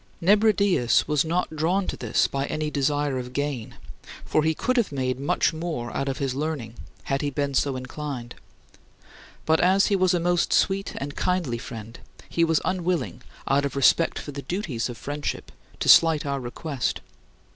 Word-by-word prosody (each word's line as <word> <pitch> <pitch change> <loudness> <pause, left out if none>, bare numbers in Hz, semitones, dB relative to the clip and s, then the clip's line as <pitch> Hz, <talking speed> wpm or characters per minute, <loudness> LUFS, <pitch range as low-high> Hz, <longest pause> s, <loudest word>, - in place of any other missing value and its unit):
Nebridius 200 - +3
was 150 -2 +2
not 165 0 -1
drawn 175 +5 +1
to - - -3
this - - +1
by 135 0 -2
any 155 0 -2
desire 145 -1 0
of 125 0 -7
gain 140 -5 -3 0.5
for 155 - +2
he 160 +1 +1
could 255 - 0
have 235 -9 +1
made 130 -2 -2
much 140 +3 +1
more 160 -8 -4
out 135 - -1
of 135 - -3
his 135 -4 -1
learning 140 -5 -3 0.3
had 135 0 -1
he 145 - 0
been 140 0 -2
so 135 0 +1
inclined 130 -1 -6 1.1
but 160 0 +3
as 190 +2 +4
he - - +5
was 185 -1 +3
a - - +1
most 175 0 +1
sweet 195 0 +1
and 140 +1 -5
kindly 170 -11 -1
friend, 115 0 -9 0.3
he 170 - +1
was 165 -1 +3
unwilling, 180 -6 -1 0.3
out 140 +1 +3
of 140 - -3
respect 140 +4 +3
for 145 - -6
the 140 0 -6
duties 140 - -3
of 120 - -7
friendship, 145 +2 -4 0.3
to - - -2
slight 160 -3 +6
our 140 -1 -1
request. 130 +1 -3
145 Hz, 180 wpm, -25 LUFS, 135-170 Hz, 1.1 s, slight